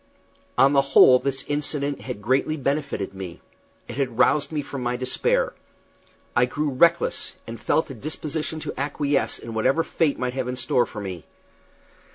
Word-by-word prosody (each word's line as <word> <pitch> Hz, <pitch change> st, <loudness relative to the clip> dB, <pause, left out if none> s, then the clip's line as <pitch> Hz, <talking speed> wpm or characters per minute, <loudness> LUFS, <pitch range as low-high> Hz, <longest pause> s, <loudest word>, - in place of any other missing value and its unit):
On 140 Hz, +1 st, +6 dB
the 140 Hz, -, +6 dB
whole 135 Hz, -2 st, +7 dB
this 135 Hz, 0 st, -3 dB
incident 145 Hz, -1 st, -2 dB
had 120 Hz, -6 st, -6 dB
greatly 135 Hz, +6 st, +1 dB
benefited 140 Hz, -8 st, -2 dB
me. 95 Hz, -3 st, -7 dB, 0.5 s
It -, -, -7 dB
had 130 Hz, -5 st, -1 dB
roused 145 Hz, +4 st, +3 dB
me 150 Hz, -2 st, -2 dB
from 140 Hz, -1 st, -6 dB
my 120 Hz, 0 st, -1 dB
despair. 475 Hz, -, 0 dB, 0.8 s
I 120 Hz, -, +5 dB
grew 150 Hz, +3 st, -2 dB
reckless, 165 Hz, +6 st, +2 dB
and 115 Hz, 0 st, -8 dB
felt 160 Hz, -, +1 dB
a -, -, -5 dB
disposition 155 Hz, +4 st, -4 dB
to -, -, -4 dB
acquiesce 140 Hz, 0 st, 0 dB
in 115 Hz, -, -8 dB
whatever 130 Hz, +9 st, +2 dB
fate 160 Hz, -4 st, 0 dB
might 125 Hz, -1 st, -2 dB
have 130 Hz, -1 st, -2 dB
in 125 Hz, -, -2 dB
store 125 Hz, 0 st, +1 dB
for 105 Hz, -, -7 dB
me. 90 Hz, -5 st, -6 dB
135 Hz, 170 wpm, -24 LUFS, 125-145 Hz, 0.8 s, whole